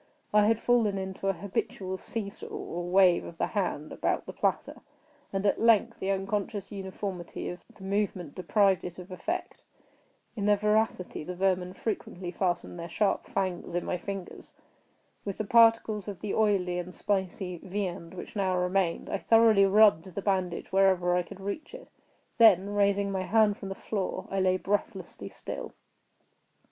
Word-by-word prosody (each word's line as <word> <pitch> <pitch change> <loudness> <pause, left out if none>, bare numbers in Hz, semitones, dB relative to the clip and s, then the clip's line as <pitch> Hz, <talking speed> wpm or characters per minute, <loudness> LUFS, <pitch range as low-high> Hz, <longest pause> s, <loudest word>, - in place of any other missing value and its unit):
I 210 0 +5
had 225 0 +3
fallen 225 -4 +2
into 190 0 -4
an 195 - +1
habitual 190 0 -3
see 225 -3 -4
saw, 200 - -9
or 175 +1 -5
wave 185 -1 +5
of 165 - -9
the - - +1
hand 180 -7 -2
about - - -1
the - - -7
platter; - - -1 0.5
and, 195 +1 -2
at 200 - +2
length, 230 0 +4
the 190 - -2
unconscious 195 +1 -2
uniformity 190 -2 -5
of 180 - -6 0.2
the 200 - -13
movement 195 -5 -2
deprived 190 +1 +2
it 175 -1 -7
of 180 +1 -10
effect. 335 - -4 0.7
In 205 -3 -1
their 205 0 +5
voracity 210 -5 0
the 180 +3 -6
vermin 185 -1 0
frequently 185 -4 -4
fastened 175 -1 -2
their 170 0 -6
sharp 205 0 0
fangs 185 -3 -2
in 175 - -1
my 180 - -2
fingers. 195 0 -7 0.7
With 200 -2 -4
the 215 - -2
particles 225 -2 +4
of 195 -4 -6
the 210 - -3
oily 190 -5 +2
and 180 +1 -7
spicy 190 -2 -2
viand 185 -2 -4
which 180 - -9
now 190 -3 +1
remained, 180 -1 0
I 200 - -2
thoroughly 225 -3 +5
rubbed 200 -4 +5
the 200 - -2
bandage 185 -3 -1
wherever 190 -2 +3
I 180 - +3
could 175 +2 -10
reach 295 - -5
it; - - -12 0.5
then, 205 -3 +6
raising 200 -1 +2
my 190 -1 -1
hand 210 +2 +3
from 195 - -7
the 195 - -4
floor, 195 -2 -3
I 195 - 0
lay 185 0 +3
breathlessly 205 +2 -3
still. - - -7
195 Hz, 170 wpm, -29 LUFS, 180-205 Hz, 0.7 s, then